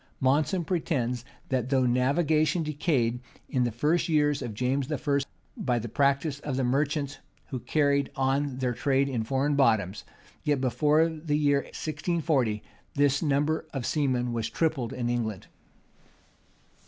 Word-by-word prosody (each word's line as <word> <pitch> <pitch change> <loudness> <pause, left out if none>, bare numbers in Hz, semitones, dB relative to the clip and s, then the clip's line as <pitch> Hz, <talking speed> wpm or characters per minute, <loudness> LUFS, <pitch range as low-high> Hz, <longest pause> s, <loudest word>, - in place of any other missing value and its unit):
Monson 150 +7 +2
pretends, 125 -9 -1 0.3
that 130 -2 0
though 130 -2 +3
navigation 150 +6 +2
decayed 140 -6 0 0.3
in 125 -2 +1
the 120 - -1
first 150 +10 +1
years 150 -2 +2
of 110 - -5
James 130 +4 -1
I., 140 -1 +1 0.4
by 125 -2 0
the 120 0 -3
practice 140 +3 +1
of 145 -3 -3
the 135 - +1
merchants, 140 +2 0 0.3
who 130 - -3
carried 140 0 +1
on 135 0 0
their 125 -2 0
trade 135 +2 +1
in 125 -5 -1
foreign 135 +5 0
bottoms,[] 110 -8 +2 0.4
yet, 145 -2 +1
before 150 +5 +3
the 155 -2 -2
year 145 -2 +2
1640, 150 - -1 0.3
this 140 -1 +3
number 150 +1 +1
of 130 -3 -2
seamen 125 -5 0
was 115 -2 -2
tripled 155 -8 -1
in 125 -3 -3
England. 115 -5 -2
140 Hz, 140 wpm, -27 LUFS, 125-150 Hz, 0.4 s, though